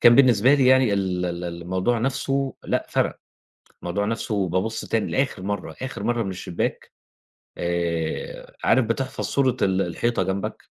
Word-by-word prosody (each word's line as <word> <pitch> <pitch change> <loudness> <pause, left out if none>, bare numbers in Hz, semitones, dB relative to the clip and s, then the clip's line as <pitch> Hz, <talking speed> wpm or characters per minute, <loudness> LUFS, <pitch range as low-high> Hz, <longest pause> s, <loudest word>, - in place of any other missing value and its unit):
كان 120 - +8
بالنسبة 130 -1 +6
لي 135 -3 +3
يعني 130 -3 +5
ال 95 -2 0
ال 85 0 -4
الموضوع 90 +7 -1
نفسُه 135 +2 -1
لأ - - -1
فَرَق، - - 0 0.7
الموضوع 90 +4 -1
نفسُه 105 -4 -1
بابُصّ 95 +6 -1
تاني 110 -2 -1
لآخر 135 -7 0
مرّه 95 -5 -3
آخر 130 +1 -5
مرّه 120 -1 +1
من 95 - -3
الشبّاك 90 -2 -3 0.7
آآ، 85 -2 -2
عارف 130 - +4
بتحفظ 125 +4 -2
صورة 130 -3 +1
ال 95 0 +3
الحيطة 115 +8 0
جنبك، 95 +1 -3
105 Hz, 150 wpm, -24 LUFS, 90-125 Hz, 0.7 s, كان